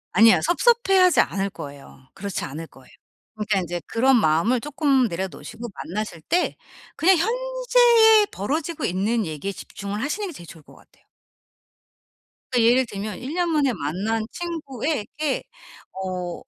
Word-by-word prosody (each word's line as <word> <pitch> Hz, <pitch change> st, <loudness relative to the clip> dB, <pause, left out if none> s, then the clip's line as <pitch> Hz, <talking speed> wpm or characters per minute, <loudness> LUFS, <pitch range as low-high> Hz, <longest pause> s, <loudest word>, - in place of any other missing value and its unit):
아니야. 225 Hz, 0 st, +6 dB
섭섭해하지 385 Hz, -2 st, +4 dB
않을 195 Hz, 0 st, -2 dB
거예요. 140 Hz, -2 st, -11 dB
그렇지 195 Hz, 0 st, -5 dB
않을 155 Hz, +4 st, -7 dB
거예요. 130 Hz, -1 st, -19 dB, 0.4 s
그러니까 210 Hz, -2 st, 0 dB
인제 175 Hz, -1 st, -4 dB
그런 260 Hz, +3 st, +3 dB
마음을 210 Hz, +8 st, +2 dB
쪼끔 275 Hz, -3 st, +1 dB
내려 190 Hz, +3 st, -3 dB
놓으시고 235 Hz, +5 st, -9 dB, 0.2 s
만나실 195 Hz, -3 st, -5 dB
때 350 Hz, -, 0 dB, 0.4 s
그냥 370 Hz, +1 st, +4 dB
현재에 475 Hz, 0 st, +4 dB
벌어지고 305 Hz, -, -3 dB
있는 210 Hz, +5 st, 0 dB
얘기에 160 Hz, +5 st, -4 dB
집중을 200 Hz, +2 st, -6 dB
하시는 395 Hz, +8 st, -2 dB
게 350 Hz, -, -8 dB
제일 175 Hz, -, -11 dB
좋을 160 Hz, -2 st, -13 dB
것 -, -, -18 dB
같아요. -, -, -24 dB, 1.5 s
그러니까 245 Hz, -, +3 dB
예를 255 Hz, +1 st, +4 dB
들면 205 Hz, -2 st, -6 dB
1 265 Hz, +4 st, -6 dB
년 350 Hz, 0 st, 0 dB
만에 280 Hz, -5 st, +2 dB
만난 195 Hz, +8 st, -2 dB
친구에게 300 Hz, -, -3 dB, 0.5 s
어 185 Hz, -2 st, -5 dB
230 Hz, 330 characters per minute, -23 LUFS, -, 1.5 s, 아니야